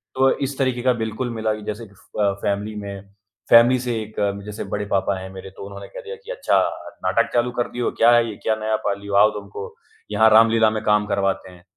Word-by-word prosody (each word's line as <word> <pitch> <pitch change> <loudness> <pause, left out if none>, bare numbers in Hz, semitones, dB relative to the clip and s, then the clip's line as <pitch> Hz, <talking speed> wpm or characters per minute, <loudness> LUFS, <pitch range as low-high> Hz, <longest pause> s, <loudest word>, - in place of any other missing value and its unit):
तो 135 0 +4 0.2
इस 140 - -7
तरीके 130 -2 0
का 125 0 +3
बिल्कुल 110 +3 -3
मिला 110 -1 -1
कि 105 - -7
जैसे 110 +2 -8
फ़ 100 +2 -13
अ, 100 -1 +3
फ़ैमिली 105 +1 -2
में 100 -1 -8 0.4
फ़ैमिली 120 +2 +7
से 125 -1 -2
एक 110 0 -10 0.3
जैसे 105 0 -6
बड़े 105 0 -2
पापा 100 -1 0
हैं 95 0 -8
मेरे 95 0 -9
तो 95 - -11
उन्होंने 100 0 -9
कह - - -10
दिया 465 +3 -6
कि 470 +1 -10
"अच्छा - - +1 0.5
नाटक - - +2
चालू 120 0 +1
कर 120 -1 -1
दिए 125 - -5
हो। - - 0
क्या 115 +1 +7
है 120 -1 +4
ये? 105 - -6
क्या 110 - +2
नया 110 0 -1
पाल 100 0 -1
लिए 100 0 -10
हो? 100 - -1
आओ 105 +2 +7
तुमको 100 0 -9 0.4
यहाँ 110 +2 +5
रामलीला 115 0 +5
में 110 0 -3
काम 105 -1 +3
करवाते 100 -2 -1
हैं।" 90 -1 -17
110 Hz, 240 wpm, -22 LUFS, 100-120 Hz, 0.5 s, फ़ैमिली